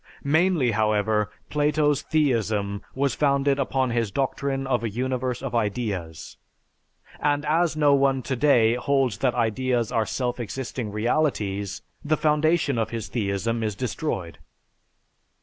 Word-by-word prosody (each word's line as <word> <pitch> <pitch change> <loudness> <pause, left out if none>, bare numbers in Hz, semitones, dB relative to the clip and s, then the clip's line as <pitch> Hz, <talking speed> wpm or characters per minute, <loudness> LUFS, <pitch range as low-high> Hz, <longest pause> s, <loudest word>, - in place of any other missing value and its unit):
Mainly, 155 -3 +2
however, 105 -1 +1 0.2
Plato's 150 -1 +2
theism 110 -9 0
was 140 +1 +1
founded 140 -1 +2
upon 130 -2 0
his 115 -2 0
doctrine 135 +3 -2
of 125 -3 0
a 115 - -1
universe 125 +2 -2
of 135 - -4
ideas, 100 -8 -3 0.8
and 145 0 0
as 160 +1 +1
no 145 -2 +4
one 135 -2 +2
today 125 -4 +3
holds 130 -3 0
that 130 -1 +1
ideas 120 0 0
are 110 -2 0
self 125 +4 -2
existing 120 -1 -4
realities, 105 -4 -1 0.2
the 155 +1 +1
foundation 150 -3 +2
of 110 - -1
his 110 -2 -5
theism 115 +1 -1
is 105 -2 -2
destroyed. 105 - -4
125 Hz, 130 wpm, -25 LUFS, 110-140 Hz, 0.8 s, no